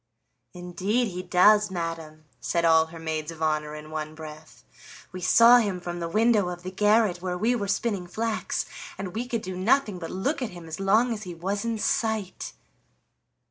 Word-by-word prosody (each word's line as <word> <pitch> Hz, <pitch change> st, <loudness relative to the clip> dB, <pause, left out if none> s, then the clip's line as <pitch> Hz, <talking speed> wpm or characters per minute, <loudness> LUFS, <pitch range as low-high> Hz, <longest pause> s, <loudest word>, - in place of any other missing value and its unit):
"Indeed 185 Hz, +7 st, -1 dB
he 180 Hz, -1 st, -5 dB
does, 200 Hz, +4 st, +4 dB
madam," 165 Hz, -3 st, -5 dB
said 170 Hz, -1 st, 0 dB
all 160 Hz, -1 st, +5 dB
her 165 Hz, +1 st, -11 dB
maids 160 Hz, -1 st, -4 dB
of 160 Hz, -1 st, -6 dB
honor 150 Hz, -1 st, -1 dB
in 155 Hz, 0 st, -10 dB
one 155 Hz, 0 st, -5 dB
breath. 155 Hz, 0 st, -11 dB, 0.5 s
"We 185 Hz, 0 st, -7 dB
saw 230 Hz, +6 st, +7 dB
him 200 Hz, -5 st, -1 dB
from 175 Hz, 0 st, -5 dB
the 170 Hz, -1 st, -3 dB
window 215 Hz, -1 st, +3 dB
of 175 Hz, 0 st, -7 dB
the 185 Hz, -, -5 dB
garret 210 Hz, -1 st, +2 dB
where 180 Hz, -1 st, -3 dB
we 225 Hz, +6 st, +1 dB
were 205 Hz, -4 st, -2 dB
spinning 200 Hz, -3 st, -1 dB
flax, 220 Hz, +5 st, -2 dB, 0.3 s
and 190 Hz, -2 st, -6 dB
we 240 Hz, +4 st, -3 dB
could 230 Hz, -3 st, -3 dB
do 185 Hz, 0 st, -5 dB
nothing 210 Hz, +1 st, +1 dB
but 165 Hz, -, -6 dB
look 270 Hz, +11 st, -2 dB
at 250 Hz, -, -2 dB
him 170 Hz, -, -10 dB
as 160 Hz, +2 st, -6 dB
long 220 Hz, +5 st, +3 dB
as 215 Hz, -, -6 dB
he 180 Hz, -4 st, -7 dB
was 195 Hz, +4 st, -3 dB
in 230 Hz, -1 st, -1 dB
sight." 220 Hz, -2 st, -2 dB
185 Hz, 190 wpm, -26 LUFS, 165-215 Hz, 0.5 s, saw